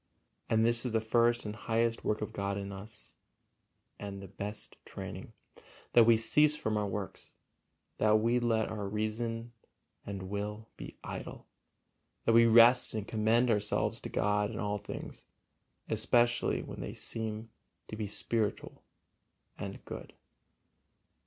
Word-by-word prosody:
And 110 0 +3
this 120 0 +3
is 125 -3 -2
the 115 - +3
first 120 +1 +2
and 105 0 -4
highest 115 +1 0
work 105 0 0
of - - -6
God 100 0 -2
in 100 0 -5
us 100 +3 -9 0.9
and 100 -1 -6
the 95 - -8
best 105 +3 -6
training, - - -7 0.6
that 120 -1 +8
we 115 0 +6
cease 150 +7 +4
from 110 -6 -1
our 105 -1 0
works, 100 0 -5 0.6
that 110 0 +5
we 115 +3 +2
let 115 -2 +1
our 105 -2 -4
reason 115 +2 -2 0.5
and 100 -2 -5
will 105 +3 -4
be - - -9
idle, - - -7 0.8
that 115 - +4
we 115 0 +7
rest 115 +1 +6
and 105 -1 -3
commend 115 +3 +2
ourselves 105 -1 0
to - - -6
God 105 0 +1
in 110 - -6
all 105 -1 -1
things, 105 - -8 0.6
especially 120 0 +2
when - - -8
they - - -5
seem 110 0 -2 0.4
to - - -6
be 105 -1 -3
spiritual 105 +1 -1 0.8
and - - -6
good. - - -8
110 Hz, 145 wpm, -32 LUFS, 105-115 Hz, 0.9 s, that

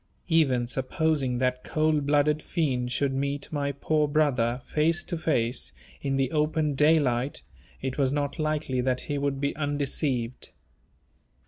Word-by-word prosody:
Even 135 -7 +3
supposing 135 0 0
that 125 0 0
cold 155 -2 +1
blooded 150 +1 +3
fiend 130 -9 -1
should 135 +1 0
meet 140 +1 -2
my 140 -2 -1
poor 150 +2 +1
brother, 130 -5 +1
face 160 +3 +1
to 175 - -4
face, 120 - 0 0.3
in 135 -1 -1
the 135 -1 +1
open 150 -1 +1
daylight, 140 -3 +2 0.4
it 130 +1 -3
was 135 -2 +3
not 145 +2 -2
likely 155 -4 0
that 130 0 0
he 145 -1 -3
would 140 -1 -1
be 140 0 -1
undeceived. 140 -4 -2
140 Hz, 140 wpm, -27 LUFS, 130-155 Hz, 0.4 s, Even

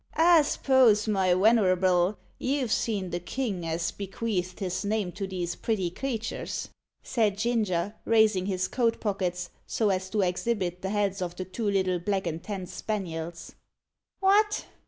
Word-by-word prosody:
"I 335 0 +6
s'pose, 255 -7 +3
my 190 -4 +3
wenerable, 185 -2 +3 0.2
you've 260 -3 -1
seen 200 -7 0
the 175 - -2
king 190 -2 -3
as 165 +1 -1
bequeathed 195 -2 -3
his 185 0 -2
name 205 -3 -1
to 190 +3 -5
these 180 -2 -3
pretty 190 -6 -1
creaters," 230 0 -4 0.3
said 215 -5 +1
Ginger, 210 -5 0
raising 215 -4 +3
his 185 -1 0
coat 235 -3 0
pockets, 180 -4 -2 0.2
so 220 -3 +1
as 185 0 -2
to 210 +1 0
exhibit 180 -1 -1
the 190 - -3
heads 200 -1 0
of 175 -1 -3
the 185 - -5
two 205 +4 -2
little 185 -2 +1
black 195 +2 -1
and 165 +1 -3
tan 195 -1 -5
spaniels. 170 -5 -5 0.7
"What! 415 +2 +3
195 Hz, 150 wpm, -27 LUFS, 180-220 Hz, 0.7 s, I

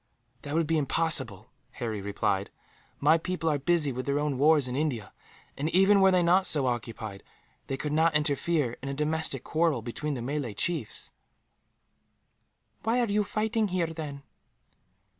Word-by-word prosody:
"That 145 +1 -5
would 165 0 +2
be 160 +1 +1
impossible," 130 - 0 0.2
Harry 110 -4 -4
replied; 100 0 -1 0.5
"my 165 - +4
people 180 -1 -2
are 145 - 0
busy 155 -1 +2
with 130 +1 -5
their 140 0 +1
own 145 -3 -1
wars 150 -2 +4
in 125 - -4
India 130 -9 -2 0.4
and, 150 +3 -2
even 195 +3 +5
were 190 - +6
they 180 -2 +3
not 180 +3 +4
so 145 -4 +3
occupied, 115 -4 -4 0.5
they 135 - -3
could 150 +2 -3
not 160 0 +3
interfere 150 -3 0
in 135 - -5
a 140 - -3
domestic 150 -3 -1
quarrel 160 -7 0
between 145 +5 -4
the 120 - -5
Malay 135 -4 -3
chiefs." 160 - -2 1.7
"Why 230 +2 +1
are 240 - +3
you 210 +1 +2
fighting 220 +1 0
here, 180 -2 0
then?" 145 -3 -7
150 Hz, 160 wpm, -28 LUFS, 130-165 Hz, 1.7 s, were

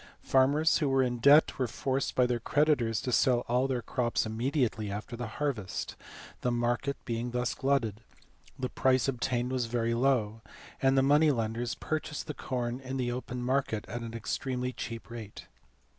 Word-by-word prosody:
Farmers 145 +4 +3
who 150 -4 +1
were 135 0 +3
in 125 -1 -1
debt 140 +5 +6
were 130 - +1
forced 135 +3 -2
by 125 - +4
their 125 -1 0
creditors 120 -5 +1
to 125 - -2
sell 120 0 +3
all 125 +3 +2
their 125 -3 -2
crops 120 -3 0
immediately 115 -1 -1
after 105 +4 -5
the 120 0 -4
harvest; 120 -11 -3 0.5
the 125 - +1
market 120 +3 0
being 115 +1 -2
thus 125 +1 -1
glutted, 120 -6 0 0.6
the 130 - -2
price 130 +1 +2
obtained 125 -1 -1
was 125 -3 0
very 115 0 0
low, 115 -3 +1 0.4
and 135 0 +3
the 135 - +5
money 150 +3 +5
lenders 115 -3 -1
purchased 155 +6 -3
the 150 - -5
corn 125 -3 -3
in 130 0 -5
open 125 0 -4
market 125 -4 0
at 120 +4 -5
an 115 0 -6
extremely 125 +2 -2
cheap 115 -1 -6
rate. 110 -3 -8
125 Hz, 170 wpm, -30 LUFS, 115-135 Hz, 0.6 s, debt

